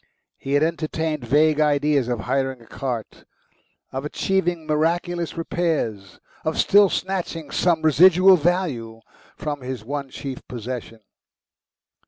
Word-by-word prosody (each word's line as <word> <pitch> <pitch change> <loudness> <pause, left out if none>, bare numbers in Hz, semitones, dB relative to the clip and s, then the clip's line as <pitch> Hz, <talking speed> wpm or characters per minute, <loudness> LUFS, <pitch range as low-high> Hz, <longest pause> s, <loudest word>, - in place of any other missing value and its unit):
He 135 - -4
had 145 +1 +4
entertained 160 -4 -2
vague 150 +4 +3
ideas 145 -3 +2
of 120 -3 -2
hiring 130 +2 -1
a 115 - -17
cart, 120 -3 -5 0.7
of 135 +1 -4
achieving 175 +1 -1
miraculous 170 +3 -1
repairs, 160 - -2 0.2
of 155 - -2
still 205 -1 +5
snatching 175 -5 -3
some 170 -3 +1
residual 185 +5 +6
value 145 -10 -1 0.4
from 145 -2 -4
his 125 -3 -6
one 140 +1 -4
chief 135 -1 -6
possession. 120 -1 -6
150 Hz, 120 wpm, -23 LUFS, 130-170 Hz, 0.7 s, residual